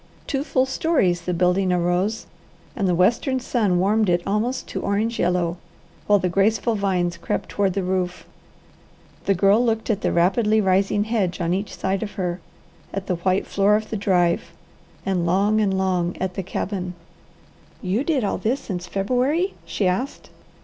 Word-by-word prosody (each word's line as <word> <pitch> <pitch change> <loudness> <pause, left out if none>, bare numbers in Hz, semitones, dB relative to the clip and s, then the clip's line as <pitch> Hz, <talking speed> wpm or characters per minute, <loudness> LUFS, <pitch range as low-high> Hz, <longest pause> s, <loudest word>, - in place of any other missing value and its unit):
Two 275 -2 -1
full 260 -3 +1
stories 265 - +1
the 180 - -3
building 180 +2 +2
arose, 180 +5 0 0.5
and 200 -4 0
the 180 - +2
western 235 - +2
sun 220 -7 +1
warmed 205 +3 +2
it 175 0 +2
almost 215 +6 -1
to - - -4
orange 215 +4 -1
yellow, 175 -1 +1 0.5
while 205 - +5
the 185 - 0
graceful 215 +5 +2
vines 185 -4 0
crept 170 - -3
toward 195 -2 0
the 195 0 -1
roof. 180 -1 -2 1.0
The 195 - +3
Girl 200 +5 +4
looked 225 -1 0
at 205 -1 -2
the - - 0
rapidly 210 +5 +3
rising 195 +1 +2
hedge 210 -5 -1
on 170 0 0
each 195 +2 -3
side 190 0 -1
of 210 -1 -4
her, 180 -2 -2 0.5
at 195 -1 -4
the 180 -3 -1
white 185 +2 +1
floor 200 +1 +3
of 215 0 -3
the - - -1
drive, 180 -4 +1 0.5
and 185 -3 0
long 200 +5 +2
and 195 -2 +1
long 180 -2 0
at 185 0 -2
the 195 - -3
cabin. 185 -1 -4 0.9
"You 200 +7 0
did 295 -6 0
all 200 - -1
this 250 +5 0
since 180 -3 -5
February?" 255 - 0
she 200 - -1
asked. 190 +10 -2
195 Hz, 170 wpm, -23 LUFS, 180-220 Hz, 1.0 s, while